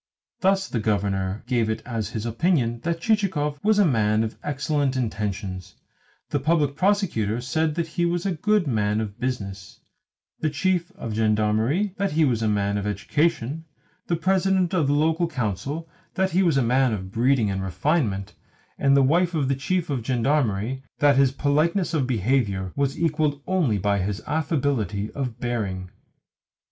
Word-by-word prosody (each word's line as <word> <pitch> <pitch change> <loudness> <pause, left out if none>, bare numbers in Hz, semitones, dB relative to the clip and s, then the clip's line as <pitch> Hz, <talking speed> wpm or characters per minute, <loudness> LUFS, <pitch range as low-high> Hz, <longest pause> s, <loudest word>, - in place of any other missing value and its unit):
Thus 190 0 +2
the 120 - -2
Governor 100 -2 -1
gave 120 -3 +1
it 110 0 -3
as 115 -5 -3
his 110 -1 -4
opinion 120 -1 +1
that 165 +4 -2
Chichikov 175 -10 0
was 215 0 +3
a 205 - +5
man 110 -6 +2
of 110 - -4
excellent 145 -1 -1
intentions; 100 -5 -3 0.6
the 145 - +1
Public 145 -1 +1
Prosecutor, 170 - +1
that 160 +5 -1
he 175 +2 -1
was 175 +1 -1
a 195 - +1
good 205 +3 +1
man 105 -5 0
of 105 -2 -5
business; 100 -6 -4 0.6
the 155 - 0
Chief 170 +4 0
of 115 - -6
Gendarmery, 110 - +1
that 200 -5 -1
he 160 0 +4
was 120 -5 +1
a 110 - +1
man 100 -1 0
of 100 - -3
education; 150 +6 -1 0.4
the 170 - +1
President 190 +1 +1
of 165 -6 +2
the 140 - +2
Local 160 +3 +2
Council, 135 - -3 0.3
that 190 0 +1
he 185 - +3
was 170 -7 +3
a 135 - +3
man 125 +1 +2
of 95 -2 -5
breeding 120 -2 +2
and 95 0 -2
refinement; 100 - -1 0.5
and 140 0 +4
the 140 - +5
wife 170 +5 +2
of 140 -4 0
the 135 - +2
Chief 170 +4 -1
of 130 -4 -1
Gendarmery, 125 -2 0 0.2
that 145 -1 +4
his 135 -1 +4
politeness 155 +6 +1
of 140 -6 +1
behaviour 105 -5 0
was 140 0 -1
equalled 155 -3 +1
only 170 - +1
by 100 +1 +1
his 100 +2 -2
affability 140 -9 -1
of 125 -4 -4
bearing. 100 -7 -3
135 Hz, 165 wpm, -24 LUFS, 110-160 Hz, 0.6 s, a